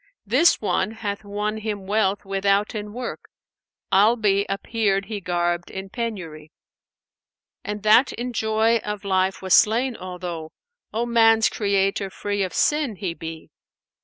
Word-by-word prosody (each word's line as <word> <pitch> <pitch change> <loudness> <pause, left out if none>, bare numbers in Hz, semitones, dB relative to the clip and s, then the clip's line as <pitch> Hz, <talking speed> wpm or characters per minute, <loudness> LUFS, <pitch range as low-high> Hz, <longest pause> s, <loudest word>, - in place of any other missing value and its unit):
This 260 - +4
one 210 0 0
hath 205 -2 -5
won 210 +1 -3
him 210 -3 -4
wealth 200 0 0
withouten 200 +2 0
work; 245 +3 -6 0.3
* - - -17
Albe 205 0 +4
appeared 195 -1 0
he 210 -2 -5
garbed 175 -1 -1
in 190 0 -7
penury. 175 -10 -5 1.1
And 210 0 -5
that 220 +5 +5
in 245 +1 -5
joy 220 +1 +2
of 210 -2 -5
life 190 0 0
was 190 - +1
slain, 235 +4 +4
although 180 -4 -7 0.2
* 485 - -64
O 230 +2 -1
man's 225 -1 +4
Creator 195 -1 0
free 205 +1 -3
of 185 -2 -1
sin 295 -7 +1
he 185 -3 -3
be.' 160 -1 -9
205 Hz, 140 wpm, -23 LUFS, 190-225 Hz, 1.1 s, that